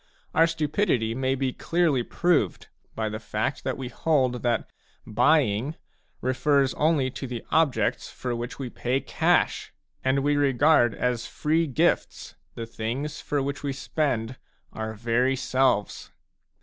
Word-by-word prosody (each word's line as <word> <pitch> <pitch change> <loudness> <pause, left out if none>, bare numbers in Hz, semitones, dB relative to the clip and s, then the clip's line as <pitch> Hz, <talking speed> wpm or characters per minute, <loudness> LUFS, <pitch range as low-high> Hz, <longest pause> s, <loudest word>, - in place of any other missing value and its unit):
Our 165 +1 +5
stupidity 155 - 0
may 130 +2 0
be 130 -1 -1
clearly 165 -6 +1
proved 150 - 0 0.3
by 110 -1 -1
the 110 0 -4
fact 110 +4 -3
that 130 - -2
we 130 - -5
hold 130 -4 +1
that 120 -2 0 0.4
"buying" 125 +1 +2 0.5
refers 135 +2 +2
only 150 -4 +1
to 135 - -6
the 120 -2 -6
objects 155 -4 +1
for 125 -2 -4
which 120 +2 -5
we 130 -3 -5
pay 125 +2 -1
cash; 135 - +1 0.3
and 135 +1 +1
we 145 0 +2
regard 140 -3 +4
as 125 -2 -1
free 160 +2 0
gifts 130 - 0 0.2
the 115 - -5
things 120 +7 -4
for 145 -2 -1
which 140 +1 -4
we 140 -1 -2
spend 130 -4 -2 0.4
our 110 0 -4
very 120 +4 +1
selves. 130 -5 0
130 Hz, 140 wpm, -26 LUFS, 120-145 Hz, 0.5 s, Our